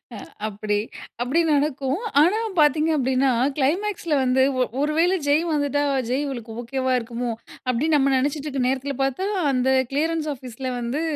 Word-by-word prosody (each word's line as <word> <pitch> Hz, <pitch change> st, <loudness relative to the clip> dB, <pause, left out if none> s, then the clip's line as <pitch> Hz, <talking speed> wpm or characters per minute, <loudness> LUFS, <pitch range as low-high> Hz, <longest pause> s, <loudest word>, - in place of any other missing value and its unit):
அ -, -, -7 dB, 0.3 s
அப்டி 210 Hz, 0 st, -2 dB, 0.5 s
அப்டி 280 Hz, +7 st, +2 dB
நடக்கும். 285 Hz, +2 st, 0 dB, 0.2 s
ஆனா 370 Hz, +8 st, +3 dB, 0.2 s
பார்த்தீங்க 305 Hz, +2 st, +4 dB
அப்டீன்னா, 265 Hz, 0 st, +2 dB, 0.3 s
கிளைமேக்ஸ்ல 340 Hz, +4 st, 0 dB
வந்து 255 Hz, +1 st, +2 dB, 0.2 s
ஒ -, -, +5 dB, 0.2 s
ஒரு 295 Hz, +1 st, +1 dB
வேளை 355 Hz, +3 st, +3 dB
ஜெய் 295 Hz, +3 st, +3 dB
வந்துட்டா 290 Hz, -1 st, 0 dB, 0.3 s
ஜெய் 270 Hz, +4 st, 0 dB
இவளுக்கு 240 Hz, -5 st, -6 dB
ஓகேவா 260 Hz, +2 st, -1 dB
இருக்குமோ! 235 Hz, +1 st, -4 dB, 0.4 s
அப்டீன்னு 290 Hz, +6 st, +2 dB
நம்ம 275 Hz, 0 st, +2 dB
நெனைச்சிட்டுருக்குற 275 Hz, 0 st, -1 dB
நேரத்துல 270 Hz, +2 st, -1 dB
பார்த்தா, 270 Hz, +8 st, -1 dB, 0.3 s
அந்த 255 Hz, 0 st, +1 dB, 0.2 s
கிளியரன்ஸ் 310 Hz, +2 st, 0 dB
ஆஃபீஸ்ல 255 Hz, -1 st, -7 dB
வந்து 240 Hz, +6 st, -2 dB
275 Hz, 145 wpm, -23 LUFS, 255-300 Hz, 0.5 s, ஒ